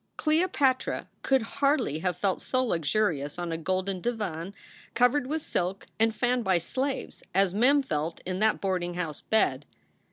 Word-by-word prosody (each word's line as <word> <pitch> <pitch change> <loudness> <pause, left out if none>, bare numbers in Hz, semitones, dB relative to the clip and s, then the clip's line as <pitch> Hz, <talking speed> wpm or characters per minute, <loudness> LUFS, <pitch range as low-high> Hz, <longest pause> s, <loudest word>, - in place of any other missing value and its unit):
Cleopatra 305 -5 +1
could 265 -3 +2 0.2
hardly 275 - +2
have 180 0 -1
felt 190 0 0
so 255 0 +1
luxurious 165 - 0
on 175 -1 -3
a 165 - -1
golden 185 +2 -1
divan 200 -6 -3 0.4
covered 250 +2 +3
with 310 +2 -2
silk 185 +2 -2
and 225 0 +3
fanned 245 +2 +1
by 190 -3 +3
slaves 265 - -3
as 195 -1 +3
Mem 270 +7 +4
felt 160 - -2
in 185 0 -2
that 220 0 +2
boarding 180 -3 -1
house 165 -4 -4
bed. 145 -11 +1
195 Hz, 155 wpm, -28 LUFS, 175-255 Hz, 0.4 s, Mem